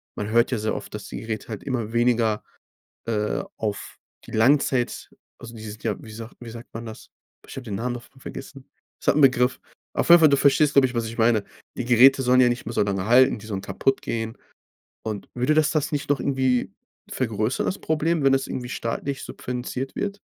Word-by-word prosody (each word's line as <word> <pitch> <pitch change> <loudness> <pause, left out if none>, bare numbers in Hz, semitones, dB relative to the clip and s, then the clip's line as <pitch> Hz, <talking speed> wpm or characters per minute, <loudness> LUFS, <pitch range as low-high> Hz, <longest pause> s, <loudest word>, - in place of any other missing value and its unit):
man 105 - -4
hört 115 +2 +3
ja 125 - +1
sehr 110 +1 -1
oft, - - -7
dass 105 -2 -7
die - - -6
Geräte 110 -1 -5
halt 110 - -5
immer 120 -5 -3
weniger, 115 -3 +2 0.6
äh, 105 -2 -1 0.2
auf 105 -2 -4 0.3
die - - -12
Langzeit 130 +1 +2 0.3
also, 120 -1 -10
die 110 - -9
sind 110 0 -9
ja, - - 0
wie 110 - -10
sagt 110 +1 -9
wie 120 -2 -9
sagt 115 +1 -11
man 115 +1 -6
das? 110 -1 -10 0.3
Boah, - - -20
ich - - -9
habe 135 - -5
den 105 -4 -4
Namen 120 +4 -2
davon 120 +2 -12
vergessen. 135 0 -9 0.3
Es - - -12
hat - - +5
'n 150 - +3
Begriff. 125 -2 +4 0.3
Auf - - -1
jeden 170 0 +10
Fall, 155 -2 +7
du 140 - +4
verstehst, 145 +1 +4
glaube 135 -3 +6
ich, 125 - -8
was 115 -1 0
ich 115 +1 -7
meine. 115 -2 +3 0.3
Die 125 - -2
Geräte 125 +3 +6
sollen 125 +1 +5
ja 125 - +5
nicht 120 - -3
mehr 115 - -5
so - - +1
lange 95 -1 -2
halten, 125 0 +5
die 105 - -12
sollen 100 -3 -3
kaputtgehen. 115 -1 -2 0.7
Und 105 -2 -5
würde 125 +5 +1
dass 155 -1 +3
das 150 -3 0
nicht 145 - -2
noch 145 - +2
irgendwie 130 -3 0 0.4
vergrößern 115 -1 -1
das 195 - -2
Problem, 160 0 0
wenn 135 0 +5
es 135 0 +1
irgendwie 125 -1 -5
staatlich 135 +5 -3
subventioniert 125 +2 -5
wird? 200 0 -3
120 Hz, 220 wpm, -24 LUFS, 110-135 Hz, 0.7 s, jeden